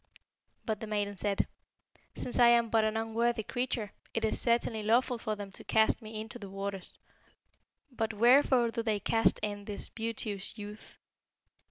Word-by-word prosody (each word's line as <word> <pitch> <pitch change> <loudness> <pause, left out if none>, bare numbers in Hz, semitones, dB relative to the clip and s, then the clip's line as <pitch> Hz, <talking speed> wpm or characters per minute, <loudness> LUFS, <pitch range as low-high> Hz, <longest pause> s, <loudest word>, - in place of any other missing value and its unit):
But 215 -2 -1
the 220 - -6
maiden 205 -1 -1
said, 200 +1 0 0.7
'Since 250 - -3
I 240 - +8
am 235 -1 +4
but 225 -1 +4
an 215 0 0
unworthy 225 0 0
creature, 235 -3 -2 0.2
it 225 -1 +1
is 220 - +1
certainly 235 -2 +1
lawful 235 +3 +2
for 215 -2 -2
them 205 -1 -7
to - - -7
cast 220 +2 +3
me 215 0 -6
into 220 +2 -7
the 200 -3 -8
waters; 195 -1 -5 0.9
but 225 -3 -1
wherefore 240 +2 +5
do 230 - -2
they 220 -2 0
cast 225 +2 +2
in 205 -1 -3
this 205 -1 -5
beauteous 220 -3 -3
youth?' 210 0 -9
220 Hz, 165 wpm, -31 LUFS, 205-235 Hz, 0.9 s, I